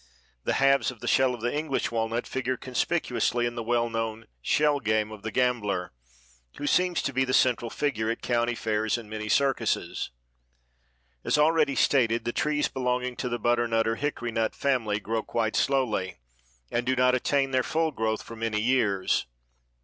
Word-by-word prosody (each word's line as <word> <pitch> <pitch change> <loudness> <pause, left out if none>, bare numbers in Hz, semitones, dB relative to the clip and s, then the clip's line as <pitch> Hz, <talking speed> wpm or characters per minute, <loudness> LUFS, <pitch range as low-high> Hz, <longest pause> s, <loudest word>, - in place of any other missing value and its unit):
The - - +1
halves 135 0 +3
of 125 -3 -9
the - - -7
shell 130 -1 +3
of 120 - -12
the 120 +1 -1
English 150 -2 -1
walnut 115 +1 -1
figure 130 -1 -2
conspicuously 125 -3 0
in 120 - -2
the 120 - -4
well 120 +1 +1
known 115 -1 -3 0.2
"shell 145 - +2
game" 110 -3 0
of 110 -2 -9
the 110 - -4
gambler 105 - 0 0.6
who 145 - -4
seems 180 +3 +2
to 140 - -2
be 130 +1 +2
the 130 0 +1
central 120 -2 +2
figure 115 -5 -1
at 115 - -3
county 120 0 +1
fairs 110 0 0
and 115 -2 -9
many 110 0 -4
circuses. 135 +1 0 1.1
As - - +1
already 150 -2 +3
stated, 120 -4 +2
the 120 - -1
trees 150 0 +1
belonging 125 -1 -2
to 125 - -2
the 120 - -1
butternut 120 -2 +1
or 115 - +1
hickory 120 -5 -3 0.2
family 115 -7 0
grow 110 +2 -2
quite 110 -1 -2
slowly, 110 -9 0 0.5
and 120 - 0
do 130 +1 +1
not 125 0 +3
attain 135 +2 +1
their 130 -1 +3
full 160 +4 0
growth 110 -4 -2
for 115 - -10
many 110 -1 -1
years. 105 - +1
120 Hz, 175 wpm, -27 LUFS, 115-135 Hz, 1.1 s, halves